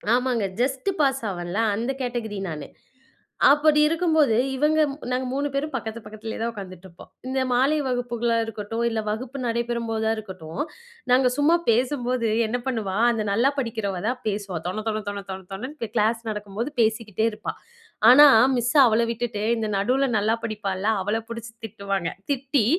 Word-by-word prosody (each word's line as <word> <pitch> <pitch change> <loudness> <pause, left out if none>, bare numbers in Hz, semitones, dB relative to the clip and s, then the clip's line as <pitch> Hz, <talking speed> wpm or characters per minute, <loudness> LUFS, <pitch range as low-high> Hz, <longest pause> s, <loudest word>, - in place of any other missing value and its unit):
ஆமாங்க. 250 -2 0
இந்த 190 0 -12
just 265 +7 -1
pass 270 -2 +2
ஆவேன்ல, 175 +2 -4 0.2
அந்த 235 +5 -1
கேட்டகரி 235 -4 -3
நானு. 155 -2 -6 0.8
அப்படி 300 +1 +4
இருக்கும்போது 315 -6 +2 0.2
இவங்க 300 +3 +2 0.3
நாங்க 255 +1 0
3 280 +2 -1
பேரும் 290 +3 -2
பக்கத்து 225 -2 -4
பக்கத்துலயேதான் 220 +2 -5
ஒக்காந்துட்டிருப்போம். 185 -4 -11 0.2
இந்த 265 +1 -1
மாலை 265 +5 +3
வகுப்புகளா 240 -2 0
இருக்கட்டும், 225 +1 -4
இல்ல 225 -1 -2
வகுப்பு 245 +5 -4
நடைபெறும்போதா 230 -1 -1
இருக்கட்டும், 190 - -6 0.5
நாங்க 255 +1 +5
சும்மா 295 +4 +4
பேசும்போது, 245 0 +1 0.2
என்ன 235 +3 -1
பண்ணுவா? 220 -7 -2 0.2
அந்த 225 -2 -1
நல்லா 235 +7 +3
படிக்கிறவதான் 225 -2 -2
பேசுவா. 200 -3 -2
தொண 215 +4 -3
தொண 215 -1 -1
தொண 200 0 -4
தொண 190 0 -6
தொணன்னு 245 +3 -6
கிளாஸ் 225 +1 +2
நடக்கும்போது 210 +5 -4
பேசிக்கிட்டே 220 -1 0
இருப்பா. 210 0 -5 0.6
ஆனா, 290 +4 +9 0.3
மிஸ் 240 0 0
அவள 225 -1 +3
விட்டுட்டு, 230 -3 -3
இந்த 220 -1 -2
நடுல 255 +7 +2
நல்லா 215 +2 +2
படிப்பால்ல 205 -3 -3
அவள 205 +4 0
புடிச்சு 230 -1 -7
திட்டுவாங்க. 200 -4 -3 0.2
திட்டி, 275 -3 +1
230 Hz, 145 wpm, -24 LUFS, 210-255 Hz, 0.8 s, ஆனா